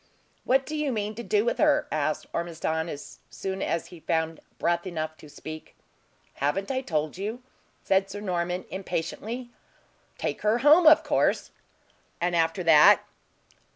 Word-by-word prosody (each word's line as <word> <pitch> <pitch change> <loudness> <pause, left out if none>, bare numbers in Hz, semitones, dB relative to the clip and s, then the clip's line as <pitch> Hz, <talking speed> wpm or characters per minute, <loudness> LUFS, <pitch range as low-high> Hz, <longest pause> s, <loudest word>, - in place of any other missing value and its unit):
"What 265 +1 +3
do 310 - -5
you 300 -2 0
mean 210 -2 -2
to 230 - -7
do 420 - +1
with - - 0
her?" - - +3
asked - - -1
Ormiston, 160 -1 -2
as 145 - -9
soon 190 0 -5
as 165 - -1
he 175 - -11
found 160 -1 -1 0.2
breath 170 +3 0
enough 160 -3 -4
to 150 - -14
speak. 155 +2 -9 0.6
"Haven't 185 - -1
I 260 -1 -1
told 155 - -2
you?" 220 +5 -4 0.4
said 195 0 +2
Sir 205 +1 -6
Norman, 180 -2 -2
impatiently. 220 +6 -4 0.7
"Take - - -3
her 215 +2 +2
home, 315 +3 +7
of 315 0 +8
course." - - +1 0.7
"And 175 0 0
after 165 +2 +1
that?" 155 -3 +7
185 Hz, 155 wpm, -27 LUFS, 165-235 Hz, 0.7 s, of